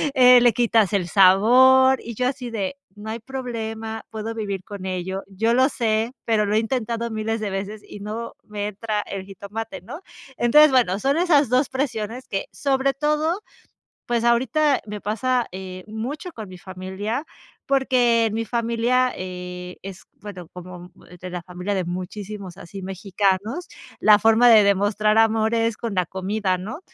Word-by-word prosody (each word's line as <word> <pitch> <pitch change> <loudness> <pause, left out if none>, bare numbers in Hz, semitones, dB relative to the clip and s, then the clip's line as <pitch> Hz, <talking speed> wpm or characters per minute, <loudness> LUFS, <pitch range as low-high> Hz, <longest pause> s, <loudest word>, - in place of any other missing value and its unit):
eh, 250 -1 +8
le 240 -2 +5
quitas 225 -3 +2
el 185 -3 +1
sabor", 255 +8 +6
y 235 - -6
yo 250 +3 0
así 255 -2 -4
de: 215 +3 -3 0.2
"No 210 +1 -8
hay 225 - -4
problema, 225 -3 -5
puedo 225 +1 -5
vivir 200 -4 -4
con 200 -1 -8
ello". 190 +1 -3
Yo 225 +4 0
lo 260 +1 +5
sé, 225 -2 0
pero 220 -2 +2
lo 205 - 0
he 220 - +5
intentado 230 0 -2
miles 220 +1 -2
de 210 - -2
veces 200 +2 -5
y 205 - -10
no 220 +3 -5
me 210 -1 -4
entra 210 +1 -3
el 195 -1 -6
jitomate, 200 +3 -7
¿no?, 285 - -9 0.4
entonces, 300 +5 +6
bueno, 230 -7 +2
son 275 +5 +1
esas 310 -5 +4
2 255 +2 +2
presiones 250 -2 -3
que 195 - -3
sobre 275 -1 0
todo, 300 +6 0 0.7
pues 235 -1 0
ahorita 265 +5 +2
me 210 0 -6
pasa, 245 +4 0
eh, 185 -1 -8
mucho 260 - -5
con 215 -7 -8
mi 185 - -11
familia, 190 - -5 0.4
porque 250 -4 +3
en 215 - -2
mi 230 - -1
familia, 235 +2 +1
eh, 180 0 -7
es 190 -1 -9 0.2
bueno, 185 -5 -9
como 180 0 -10 0.3
de 185 - -7
la 180 -1 -5
familia 180 +3 -4
de 185 -2 -1
muchísimos 185 +1 -6
así 195 +2 -9
mexicanos, 195 - -1 0.3
la 210 -1 +6
forma 225 +3 +5
de 220 -3 +7
demostrar 205 +2 +2
amor 225 0 +3
es 230 -1 +1
con 230 -3 -4
la 180 -2 +1
comida, 190 +1 -1
¿no?, 210 - -7
220 Hz, 170 wpm, -23 LUFS, 195-245 Hz, 0.7 s, eh